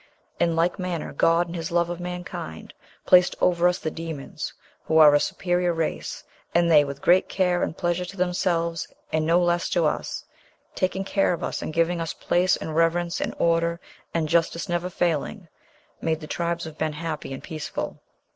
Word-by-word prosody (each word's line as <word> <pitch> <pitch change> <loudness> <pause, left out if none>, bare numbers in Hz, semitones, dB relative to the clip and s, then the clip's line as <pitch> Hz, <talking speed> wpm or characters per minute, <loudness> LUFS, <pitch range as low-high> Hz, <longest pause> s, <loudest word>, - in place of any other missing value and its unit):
In 170 -1 +2
like 170 +3 +1
manner 180 -3 -3
God 165 +4 +3
in 170 - -7
his 165 -2 -4
love 170 0 +1
of 175 - -5
mankind 180 - -6 0.3
placed 180 -1 +6
over 175 -1 +3
us 180 0 +2
the 155 - -3
demons, 160 -4 -6 0.3
who 160 - +2
are 150 -2 +8
a 145 - +5
superior 175 +2 0
race, 165 -1 -3 0.3
and 170 0 +4
they, 150 -2 +7
with 140 -1 -7
great 180 +2 +4
care 180 -2 +1
and - - -2
pleasure 175 0 0
to 195 +3 -10
themselves 175 -2 0 0.3
and 155 0 +1
no 170 +2 +5
less 175 -1 +1
to 170 -2 +2
us, 150 - -2 0.5
taking 185 +1 -1
care 195 -1 +1
of 170 - -5
us - - -3
and - - -4
giving 165 +1 +1
us 165 - -3
place 180 +1 +2
and 155 - -5
reverence 170 +1 +1
and - - -2
order 170 0 +1 0.3
and 165 -2 0
justice 170 +3 +1
never 175 0 -1
failing, 175 +2 -1 0.5
made 160 -1 0
the 155 - -8
tribes 170 +1 -2
of 160 -1 -9
men 155 -1 0
happy 155 -2 -5
and 135 - -6
peaceful 155 -2 -5
170 Hz, 185 wpm, -25 LUFS, 160-175 Hz, 0.5 s, are